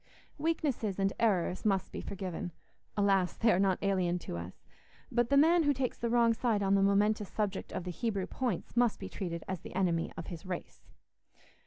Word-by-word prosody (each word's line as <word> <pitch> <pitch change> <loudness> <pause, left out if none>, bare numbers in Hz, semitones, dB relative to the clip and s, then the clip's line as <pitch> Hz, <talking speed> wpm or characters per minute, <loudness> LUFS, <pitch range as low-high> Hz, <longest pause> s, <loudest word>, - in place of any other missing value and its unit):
Weaknesses 285 - 0
and 195 0 +1
errors 190 -5 +1
must 195 -3 +1
be - - -5
forgiven—alas! 185 +1 -2
they 225 0 +4
are 180 - +3
not 190 -2 +3
alien 185 -3 +1
to 165 - -6
us—but 95 - -5
the 280 - +4
man 330 +4 +6
who 290 -2 +2
takes 255 -1 -1
the 235 - -1
wrong 235 -1 +4
side 225 -3 0
on 195 0 +2
the 195 - +4
momentous 205 +1 +2
subject 205 -2 -2
of - - -3
the 180 - -4
Hebrew 200 0 -2
points 240 -4 -3
must 240 -2 +3
be - - -6
treated 170 -4 -4
as 190 -2 -3
the - - -10
enemy 175 -3 +1
of 165 - -5
his 170 -2 -7
race. 185 -2 -7
195 Hz, 185 wpm, -32 LUFS, 180-230 Hz, -, man